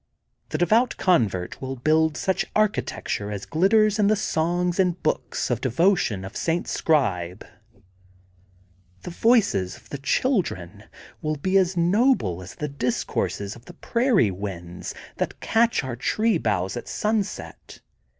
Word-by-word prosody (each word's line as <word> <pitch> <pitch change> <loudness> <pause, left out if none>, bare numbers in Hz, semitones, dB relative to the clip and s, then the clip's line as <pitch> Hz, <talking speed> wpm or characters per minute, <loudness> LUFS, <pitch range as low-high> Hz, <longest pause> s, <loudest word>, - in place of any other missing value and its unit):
The - - -2
de 175 - +3
vout 230 +6 +2
convert 105 - +1
will 135 0 -4
build 155 +4 +2
such 190 - 0
architecture 210 - -1
as 100 -1 -5
glitters 215 +5 +3
in 205 - +4
the 215 - +4
songs 175 -1 0
and 180 -2 +2
books 155 - -1
of 120 - -1
devotion 130 - +1
of 95 - -9
St. 170 +1 -1
Scribe. 95 - 0 1.6
The - - -6
voices 195 - +2
of - - -21
the 140 - -5
children 110 - -1 0.4
will 155 0 -1
be 185 +7 -1
as 185 -1 +3
noble 175 - +2
as 90 - -10
the 150 - -3
discourses 125 -6 -2
of 120 +1 -16
the - - -12
prairie 235 - +2
winds 90 -3 -6 0.2
that - - -3
catch 230 -6 +2
our 130 -3 -4
tree 215 - +1
boughs 95 -5 -1
at 120 - -6
sunset. 215 -1 -3
160 Hz, 140 wpm, -24 LUFS, -, 1.6 s, in